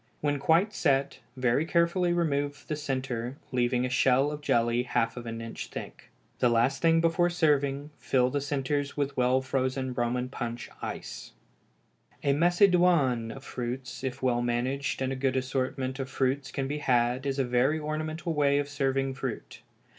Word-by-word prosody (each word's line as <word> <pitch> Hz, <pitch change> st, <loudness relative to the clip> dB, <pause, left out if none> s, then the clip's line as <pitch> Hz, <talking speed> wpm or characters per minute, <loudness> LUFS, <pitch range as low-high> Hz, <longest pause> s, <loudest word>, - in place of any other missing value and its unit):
When 145 Hz, -1 st, 0 dB
quite 170 Hz, +9 st, +3 dB
set, 140 Hz, -5 st, +1 dB, 0.2 s
very 125 Hz, +3 st, +2 dB
carefully 170 Hz, +2 st, +2 dB
remove 145 Hz, -4 st, -1 dB
the 155 Hz, -, -1 dB
centre, 130 Hz, -3 st, -3 dB
leaving 125 Hz, 0 st, +1 dB
a -, -, -2 dB
shell 130 Hz, +3 st, +3 dB
of 150 Hz, 0 st, -6 dB
jelly 120 Hz, -3 st, +2 dB
half 120 Hz, -2 st, 0 dB
an 115 Hz, -2 st, -6 dB
inch 115 Hz, 0 st, -6 dB
thick. -, -, -9 dB, 0.3 s
The 125 Hz, -, +4 dB
last 120 Hz, +4 st, +2 dB
thing 165 Hz, 0 st, +4 dB
before 170 Hz, +1 st, +3 dB
serving 145 Hz, -4 st, +1 dB
fill 125 Hz, -1 st, +2 dB
the 145 Hz, -, -1 dB
centres 145 Hz, 0 st, -2 dB
with 140 Hz, -1 st, -1 dB
well 125 Hz, +1 st, +3 dB
frozen 130 Hz, 0 st, -1 dB
Roman 125 Hz, +1 st, -1 dB
punch 120 Hz, -2 st, -5 dB
ice. -, -, -6 dB, 0.9 s
A 140 Hz, -, +3 dB
Macédoine 175 Hz, -, +3 dB
of 135 Hz, -, -11 dB
fruits, 125 Hz, +1 st, -5 dB
if 130 Hz, 0 st, -4 dB
well 120 Hz, -2 st, +2 dB
managed 130 Hz, +3 st, -1 dB
and 130 Hz, 0 st, -1 dB
a -, -, -3 dB
good 130 Hz, 0 st, 0 dB
assortment 130 Hz, 0 st, -2 dB
of 130 Hz, -1 st, -3 dB
fruits 135 Hz, +1 st, 0 dB
can 135 Hz, -1 st, -3 dB
be 145 Hz, +2 st, -3 dB
had, 125 Hz, 0 st, +1 dB
is 135 Hz, 0 st, -1 dB
a 135 Hz, -, +2 dB
very 125 Hz, +5 st, +2 dB
ornamental 155 Hz, +2 st, -3 dB
way 145 Hz, -2 st, +3 dB
of 145 Hz, 0 st, 0 dB
serving 135 Hz, -1 st, 0 dB
fruit. 130 Hz, -3 st, -6 dB
135 Hz, 165 wpm, -28 LUFS, 125-145 Hz, 0.9 s, The